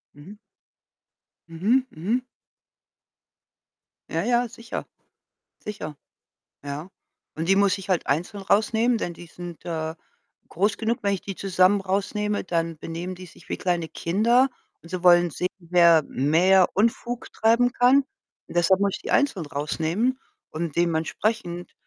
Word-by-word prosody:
Mhm. 185 +9 -12 1.1
Mhm, 215 +11 +2
mhm. 210 +11 -1 1.9
Ja, - - 0
ja, 240 0 +2
sicher. 230 0 -7 0.7
Sicher. 155 -8 -6 0.7
Ja. 145 +6 -6 0.4
Und 160 +3 -4
die 195 - +5
muss 200 -1 +3
ich 195 0 -10
halt 185 -3 0
einzeln 175 +7 -1
rausnehmen, 220 +4 +2
denn 175 -5 -3
die 175 - -12
sind, 175 -1 -10
äh, 160 -1 -3 0.5
groß 200 +5 0
genug. 225 +1 0
Wenn 200 -1 +1
ich 185 - -6
die 195 - -5
zusammen 190 +1 +3
rausnehme, 205 +2 -1
dann 165 -2 -1
benehmen 170 +3 -6
die 185 0 -10
sich - - -18
wie - - -2
kleine 175 -3 -1
Kinder 235 +9 +2 0.3
und 165 - -15
sie 185 -1 -4
wollen 175 -1 +6
sehen, 180 +5 -2
wer 170 -2 +5
mehr 175 +7 +3
Unfug 235 +3 -1
treiben 235 +2 +3
kann. 260 +2 +4 0.4
Deshalb 180 +3 +3
muss 200 -1 +1
ich - - -13
die - - -5
einzelnd 195 - +1
rausnehmen 170 - -1 0.3
und 160 -1 -4
dementsprechend, 175 +3 -1
185 Hz, 135 wpm, -24 LUFS, 170-215 Hz, 1.9 s, wollen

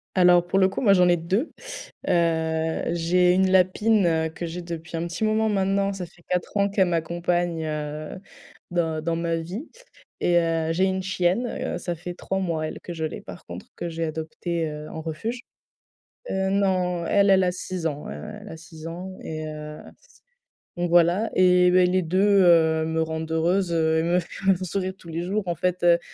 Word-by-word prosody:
Alors 180 -1 +5
pour 190 +2 +1
le 190 -1 +5
coup, 190 - -4
moi 205 -5 +5
j'en 180 -2 +5
ai 175 - +4
2, 190 - -1 0.6
heu, 160 -1 +1
j'ai 180 +1 +3
1 190 +1 +3
lapine, 190 +3 +3
heu, 160 -1 +1
que 160 +2 -7
j'ai 170 +1 -5
depuis 170 -1 -7
un 165 - -2
petit 175 +5 -3
moment 220 0 +2
maintenant, 195 -1 +1
ça 190 -2 -5
fait 175 0 -17
4 180 -1 -2
ans 200 0 +3
qu'elle 195 -2 +2
m'accompagne, 170 0 -1
heu, 150 +1 -4 0.5
dans 165 -3 -1
dans 165 +1 -1
ma 165 0 -1
vie 180 - -5 0.5
et 175 - +2
heu, 165 -1 0
j'ai 180 +3 +2
une 190 0 0
chienne, 185 +5 0
heu, - - -3
ça 175 - -3
fait 175 +2 -7
3 190 +2 -3
mois 165 -4 -1
elle - - -7
que 175 - -6
je 160 -2 -4
l'ai, - - -7
par 90 -2 -11
contre 85 +1 -8
que 175 - -5
j'ai 165 0 -3
adoptée, 160 +1 -3
heu, 150 0 -8
en 160 - -6
refuge. 170 +10 -4 0.9
Heu, 190 0 0
non, 185 -3 +1
elle, 200 +3 +3
elle 190 -1 +5
a 180 - +2
6 180 -1 -5
ans, 150 -2 -3
elle 210 0 -8
a 160 - -8
6 160 -1 -11
ans 180 +3 -6
et 155 0 -5
heu, 150 0 -7 0.2
c - - -25
c 485 - -24 0.5
donc 175 0 -1
voilà 175 +5 +4
et 180 -1 +5
beh, 180 0 +5
les 185 +1 +2
2, 195 +4 +3
heu, 160 -2 +5
me 160 0 -1
rendent 160 0 -4
heureuse, 175 +3 +1
heu 160 -1 +2
et - - 0
me 175 +2 +2
font 190 +2 0
sourire 185 +1 -2
tous 170 - -16
les 165 +1 -3
jours 200 +4 -1
en 175 - +1
fait. 180 +2 -1
Heu, 170 -1 +5
175 Hz, 205 wpm, -24 LUFS, 160-190 Hz, 0.9 s, Alors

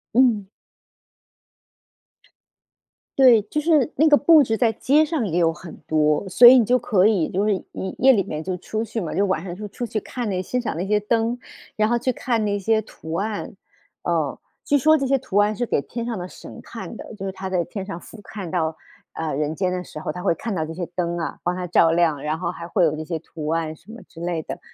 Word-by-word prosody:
嗯。 235 -6 +3 2.7
对， 245 -5 +7
就 300 +8 -3
是 305 -5 +2
那 310 +3 +4
个 290 - +7
布 310 0 +6
置 225 -2 -1
在 225 -2 +2
街 295 +7 +3
上 305 -7 -1
也 175 -3 0
有 165 -1 +3
很 170 0 -11
多， 155 +3 +2
所 210 +6 +6
以 255 +2 +10
你 230 - +3
就 250 +4 +3
可 205 -6 +3
以 195 -8 +1
就 200 +3 0
是 210 - +3 0.2
夜 190 - -5
夜 265 +1 +7
里 200 -6 +3
面 155 +1 -5
就 185 +1 -3
出 220 +5 -4
去 230 0 -4
嘛， 170 - -4
就 200 - +2
晚 185 -5 0
上 175 -1 -6
就 210 - -7
出 240 +5 -5
去 220 -2 -3
看 245 +2 -5
那 185 -1 -1
欣 250 +7 -2
赏 235 -8 -3
那 175 +4 -2
些 210 +1 +2
灯， 230 +3 0 0.4
然 215 0 +3
后 240 - +2
去 255 +2 0
看 235 -2 -1
那 205 -1 0
些 220 +2 +2
图 160 -6 -10
案， 205 +2 -3 0.5
嗯。 160 -5 -1 0.3
据 285 -1 +3
说 310 +4 +5
这 275 - -1
些 275 - +2
图 245 -6 -3
案 210 +1 +3
是 245 - -2
给 - - +1
天 235 +10 -5
上 230 -4 -3
的 180 - -5
神 - - -12
看 - - -8
的， - - -9
就 200 -3 -9
是 190 - -3
他 190 0 -6
在 180 -2 +1
天 190 +1 -6
上 195 -4 -6
俯 225 - -13
瞰 195 -5 -7
到， 160 -3 -1 0.4
啊， 160 -1 -4
人 150 +2 -1
间 185 +1 0
的 180 0 -3
时 155 - -9
候， 155 - -3
他 180 +3 -7
会 190 - +3
看 210 +3 -4
到 160 - -1
这 160 - -7
些 175 0 -5
灯 175 -1 -1
啊， 165 - -4
帮 175 +1 0
他 180 -1 -4
照 165 -1 +4
亮， 160 -4 +1
然 155 +1 -2
后 175 - -2
还 170 -1 -7
会 180 +1 +1
有 155 -2 +2
这 155 0 -6
些 165 -1 -3
图 155 -1 -8
案 160 -1 -1
什 170 +8 -16
么 235 - -10
之 165 - -13
类 170 -2 -2
的。 - - -7
195 Hz, 260 characters per minute, -22 LUFS, 170-230 Hz, 2.7 s, 以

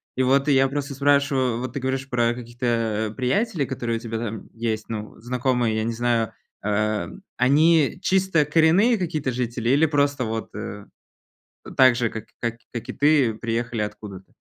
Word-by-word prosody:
И 130 - +1
вот 135 +3 +3
я 135 -1 +4
просто 140 0 -4
спрашиваю, 140 -3 +2
вот 125 0 -5
ты 140 - -3
говоришь 130 +1 -2
про 120 -2 +1
каких-то 115 -3 -2
приятелей, 155 - 0
которые 120 -3 -3
у - - -6
тебя 115 -1 -4
там 110 -1 -5
есть, 110 -1 -3
ну, 110 -1 -6
знакомые, 125 -1 0
я 110 - 0
не 115 - -1
знаю. 115 -2 0 0.3
Э, 105 +1 0 0.3
они 150 +4 +4
чисто 190 -5 +2
коренные 165 - +4
какие-то 155 -7 -2
жители 120 -1 -2
или 145 +5 +4
просто 140 -3 +1
вот, 110 0 -4
э, 105 -1 -6 0.9
так 130 -1 +7
же, 120 -2 0
как 110 -1 -7
как 115 -1 -2 0.3
и - - -3
ты, 140 -6 +3
приехали 115 0 -2
откуда-то? 105 -2 -8
125 Hz, 160 wpm, -23 LUFS, 115-140 Hz, 0.9 s, так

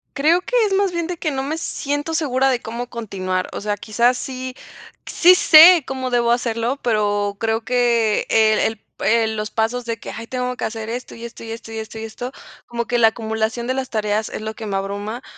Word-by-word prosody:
Creo 320 +5 +3
que - - -4
es 390 - -2
más 390 -1 +2
bien 340 -1 -2
de 355 -1 -4
que 310 -2 -2
no 265 - -2
me 295 +4 -3
siento 290 0 -3
segura 270 -4 +1
de 245 -2 -1
cómo 235 +2 -5
continuar, 185 -6 -3
o - - -6
sea, 205 0 -2
quizás 235 +4 +1
sí 255 0 -5 0.5
sí 360 +2 +6
sé 335 -1 +8
cómo 260 -1 -3
debo 235 -1 +2
hacerlo, 240 +2 0
pero 205 -3 0
creo 225 0 0
que 235 -3 +2
el 220 -1 +4
el 220 -1 0 0.2
el 225 -1 +2
los 215 0 -3
pasos 230 +2 -1
de 230 -1 -3
que - - -8
hay, 230 +1 -8
tengo 250 -1 -3
que - - -3
hacer 220 -1 -5
esto, 245 +2 -6
y 230 - -8
esto, 235 0 -10
y 225 - -8
esto 225 0 -8
y 225 - -5
esto 220 0 -8
y 220 - -6
esto 245 +3 -6 0.4
como 235 0 -3
que 240 0 0
la 225 - +7
acumulación 220 +1 -2
de 255 - -1
las 265 0 -3
tareas 215 -1 -1
es - - -6
lo 220 0 -4
que 220 -1 -8
me 195 - -2
abruma, 205 +5 -4
235 Hz, 225 wpm, -20 LUFS, 220-260 Hz, 0.5 s, sé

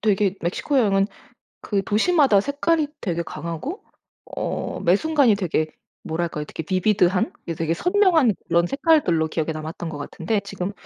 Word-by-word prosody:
되게 200 -2 +2
멕시코 230 - 0
여행은 195 -4 +3 0.5
그 200 -2 -1
도시마다 260 - +3
색깔이 290 +4 0
되게 170 -4 -2
강하고 170 - -6 0.5
어 - - -3
매 175 +3 +4
순간이 285 -6 +3
되게 165 -5 0 0.4
뭐랄까요? 160 -2 -3
되게 160 - -6
비비드한 185 0 +2 0.2
되게 165 0 0
선명한 350 - +3
그런 170 0 +3
색깔들로 275 - +2
기억에 160 0 -2
남았던 160 +2 -6
것 150 -2 -6
같은데 185 +8 -2
지금 200 -1 -5
195 Hz, 335 characters per minute, -23 LUFS, 170-275 Hz, 0.5 s, 매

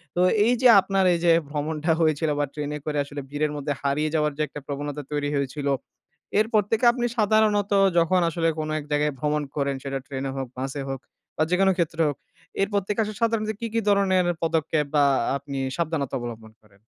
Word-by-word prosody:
তো - - -1 0.3
এই 245 - +4
যে, 255 - +7
আপনার 195 0 0
এই 170 - 0
যে, 170 - +6 0.2
ভ্রমণটা 155 +2 -1
হয়েছিল 155 0 +2
বা 145 - +2
ট্রেনে 150 0 -4
করে 150 -1 -2
আসলে 145 0 -7
ভিড়ের 150 +1 -1
মধ্যে 145 0 -2
হারিয়ে 145 +2 0
যাওয়ার 150 -1 +2
যে, - - -2
একটা 150 - -8
প্রবণতা 145 +1 -4
তৈরি 145 -1 -1
হয়েছিল, 140 +1 -2 0.7
এরপর 215 -1 +3
থেকে 225 +2 +2
আপনি 240 -1 -1
সাধারণত 210 -1 +2 0.3
যখন 170 +2 +4
আসলে 165 0 0
কোন 155 0 -3
এক - - -7
জায়গায় 150 0 +1
ভ্রমণ 150 +1 0
করেন 140 -1 0
সেটা 135 0 -3
ট্রেনে 135 -1 -4
হোক, 135 -1 -3
বাসে 135 +2 -4
হোক, 135 -1 -3 0.4
বা 155 - +3
যেকোন 190 +1 +4
ক্ষেত্রে 165 0 +1
হোক 145 - -5 0.4
এর 195 - +2
প্রত্যেকে 205 +2 0
আসলে 210 0 -6
সাধারণত 220 -2 +1
কি, 230 - -3
কি, 230 - +2
ধরনের 190 -3 +3 0.2
পদক্ষেপ, 160 -2 +1
বা 145 - +5 0.3
আপনি 140 0 -7 0.2
সাবধানতা 160 -5 -2
অবলম্বন 115 -2 -7
করেন? 105 -2 -25
150 Hz, 190 wpm, -24 LUFS, 145-190 Hz, 0.7 s, যে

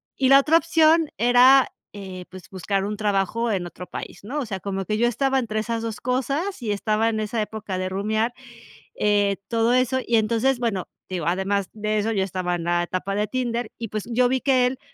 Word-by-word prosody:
Y 265 - +1
la 275 0 +8
otra 310 +4 +4
opción 325 0 +3
era, 250 +3 +6 0.2
eh, 190 -3 -8
pues 185 -1 -12
buscar 195 +1 -2
un 210 +1 -4
trabajo 210 +2 0
en 185 -3 -1
otro 180 +1 -9
país, - - -8
¿no? 285 +7 -3
O 265 - -2
sea, 195 -3 -5
como 195 0 -3
que 215 +2 -1
yo 240 +2 +3
estaba 270 +2 +1
entre 215 -3 -2
esas 230 +1 -2
dos 225 -2 -5
cosas 275 +9 -2
y 220 -3 -2
estaba 215 +2 0
en 220 - -2
esa 215 +1 -2
época 210 -3 -5
de 185 0 -2
rumiar, 215 +5 -1 0.6
eh, 205 -1 +2
todo 230 +1 +1
eso. 255 +1 +2
Y 230 -1 +2
entonces 230 +4 +1
bueno, 220 -6 -2 0.2
digo, 180 -4 -4
además 190 +2 0
de 215 0 -1
eso, 215 +2 0
yo 195 -3 +1
estaba 185 -1 -2
en 170 -1 -5
la 175 0 +1
etapa 185 +3 -3
de 210 +1 0
Tinder, 240 0 -2
y 230 - -5
pues 215 0 -3
yo 245 +2 +3
vi 260 +1 0
que 255 -3 +3
él 255 +1 -2
220 Hz, 215 wpm, -23 LUFS, 195-250 Hz, 0.6 s, la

